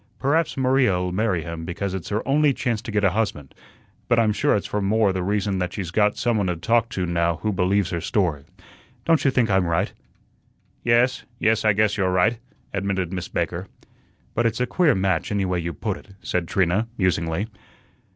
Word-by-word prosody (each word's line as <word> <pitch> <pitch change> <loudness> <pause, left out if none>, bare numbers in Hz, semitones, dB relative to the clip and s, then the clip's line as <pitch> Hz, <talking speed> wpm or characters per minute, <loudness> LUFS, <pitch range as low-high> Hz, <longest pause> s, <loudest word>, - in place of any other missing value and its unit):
Perhaps 155 +4 +1
Maria'll 125 -9 +2
marry 95 -3 0
him 85 0 -6
because 90 +3 -3
it's 95 -4 -5
her 105 +3 -2
only 145 0 +3
chance 120 -5 -1
to - - -8
get 105 -1 0
a 95 - +4
husband, 95 -10 -2 0.5
but 120 - +3
I'm 110 -2 +3
sure - - +2
it's 100 - -3
more 105 +1 +2
for - - 0
the 95 - -2
reason 100 0 0
that 90 -1 -2
she's 90 -5 -4
got 105 +2 +2
some 120 -3 +1
one 100 -3 0
to 90 - 0
talk 115 +6 +1
to 95 -5 -2
now 85 -1 +1
who 105 - +1
believes 95 0 +1
her 85 - -2
story. 80 -7 0 0.6
Don't 165 -2 +3
you 140 - +4
think 120 -5 +1
I'm 95 -2 +3
right?" 85 0 0 0.9
"Yes, 125 +2 +2
yes, 110 0 +2
I 105 -1 +4
guess 105 +1 +2
you're 95 -2 +1
right," 105 +6 +2 0.3
admitted 95 -2 -2
Miss 90 -2 -4
Baker. - - -3 0.7
"But 120 +1 +2
it's 115 +1 -2
a 125 - +2
queer 155 +5 +2
match 95 -2 0
anyway 95 -3 0
you 85 +1 -3
put 80 - -3
it," - - -16 0.2
said 90 -2 -1
Trina, 95 +5 +1
musingly. 85 0 0
100 Hz, 200 wpm, -23 LUFS, 90-115 Hz, 0.9 s, a